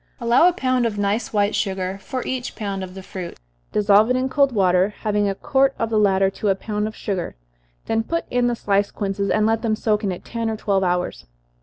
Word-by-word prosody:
Allow 240 +7 +4
a 360 - +3
pound 255 -7 +1
of 210 -2 -4
nice 205 +3 -1
white 205 -1 +1
sugar 190 -1 -2
for 255 +2 -5
each 255 -1 -4
pound 200 -3 -4
of 185 0 -8
the 190 - -8
fruit 185 -2 -7 0.3
dissolve 210 +1 +4
it 250 - +2
in 260 +1 0
cold 275 0 +3
water, 190 -1 +2
having 210 -1 +1
a 195 - -2
quart 270 +5 +1
of 225 0 -2
the 215 - +3
latter 195 -2 +3
to 210 - -4
a 195 - +3
pound 210 +1 -3
of 220 - -7
sugar, 190 -4 -3 0.5
then 225 0 +1
put 335 +9 -2
in 245 0 +2
the 240 - 0
sliced 200 -2 0
quinces, 200 -1 -2
and 215 0 +2
let 225 0 +1
them 225 -2 0
soak 215 -1 0
in 195 - 0
it 180 - -7
ten 230 -1 -3
or 220 - -3
twelve 200 -3 0
hours. 175 - -1
210 Hz, 230 wpm, -22 LUFS, 195-235 Hz, 0.5 s, Allow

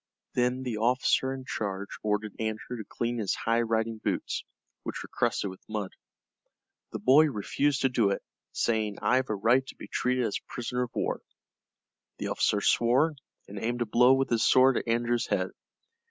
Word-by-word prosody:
Then 125 +1 +1
the 120 -4 -3
officer 125 +3 +2
in 135 -1 -6
charge 100 -3 -4
ordered 105 0 -1
Andrew 110 +2 -3
to 110 - -5
clean 120 0 -2
his 105 -4 0
high 115 +1 +1
riding 115 -1 -1
boots, - - -2 0.4
which - - -5
were - - -11
crusted 100 - 0
with 95 - -13
mud. 105 -3 -3 1.0
The - - -3
boy 140 +5 +6
refused 140 +2 0
to 130 - +4
do 115 -5 +2
it, 100 - -2 0.3
saying, 110 -3 0
"I've 130 +1 +2
a 110 - 0
right 120 +6 +3
to - - -9
be - - -10
treated 125 0 0
as 105 - -1
a - - -23
prisoner 125 +1 -2
of 125 -1 -4
war." - - -1 1.0
The - - -3
officer 105 - +1
swore, 130 +10 +3 0.3
and 100 0 -7
aimed 120 +1 0
a - - -6
blow 125 +4 +5
with 135 -1 0
his 115 -1 +2
sword 130 0 +5
at - - -3
Andrew's 120 +1 +1
head. - - 0
120 Hz, 185 wpm, -28 LUFS, 110-125 Hz, 1.0 s, boy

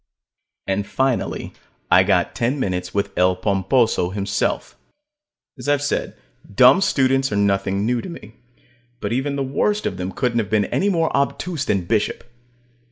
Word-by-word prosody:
And 100 +1 -1
finally 130 -2 -1 0.4
I - - +7
got - - +1
ten 125 +5 -1
minutes 90 -6 -2
with 100 -1 -2
El 90 +1 +3
Pomposo 95 +1 +1
himself. 100 +1 -2 0.8
As 125 - -4
I've 145 -1 +2
said, 145 - -2 0.4
dumb 130 - +7
students 135 -6 +2
are - - -1
nothing 100 0 +1
new 120 0 0
to - - -8
me. 110 -10 -10 0.7
But - - -3
even 135 +3 -1
the 140 - -1
worst 205 +11 0
of - - -2
them 90 +1 -4
couldn't 120 +2 0
have 105 -3 -2
been 105 -2 +2
any 200 - 0
more 165 -4 0
obtuse 145 +2 -1
than 100 -9 0
Bishop. 110 +1 -1
115 Hz, 160 wpm, -21 LUFS, 100-135 Hz, 0.8 s, I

